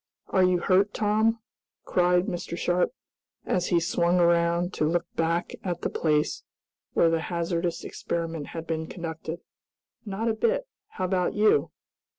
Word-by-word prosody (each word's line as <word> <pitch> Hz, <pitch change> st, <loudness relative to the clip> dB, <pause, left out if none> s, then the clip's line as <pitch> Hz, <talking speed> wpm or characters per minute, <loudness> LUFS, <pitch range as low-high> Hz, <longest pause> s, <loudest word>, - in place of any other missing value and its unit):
"Are 190 Hz, -, +3 dB
you 180 Hz, 0 st, +4 dB
hurt, 195 Hz, +3 st, +3 dB
Tom?" 220 Hz, +2 st, +2 dB, 0.5 s
cried 180 Hz, 0 st, +3 dB
Mr. 170 Hz, -1 st, -4 dB
Sharp, 175 Hz, 0 st, +1 dB, 0.5 s
as 180 Hz, -1 st, 0 dB
he 175 Hz, -, +3 dB
swung 170 Hz, +1 st, +2 dB
around 170 Hz, +1 st, +3 dB
to 155 Hz, -, 0 dB
look 170 Hz, +1 st, 0 dB
back 165 Hz, +1 st, 0 dB
at 175 Hz, -2 st, -3 dB
the -, -, -2 dB
place 150 Hz, -2 st, +1 dB, 0.5 s
where 165 Hz, -, +4 dB
the 165 Hz, -1 st, +1 dB
hazardous 170 Hz, 0 st, -2 dB
experiment 165 Hz, -3 st, -4 dB
had 165 Hz, -1 st, -6 dB
been 160 Hz, 0 st, -3 dB
conducted. 165 Hz, -1 st, -6 dB, 0.6 s
"Not 215 Hz, +1 st, -3 dB
a 225 Hz, -, +2 dB
bit! -, -, 0 dB, 0.2 s
How 185 Hz, -, -4 dB
about 180 Hz, -1 st, 0 dB
you?" 210 Hz, +1 st, +4 dB
175 Hz, 150 wpm, -27 LUFS, 165-185 Hz, 0.6 s, you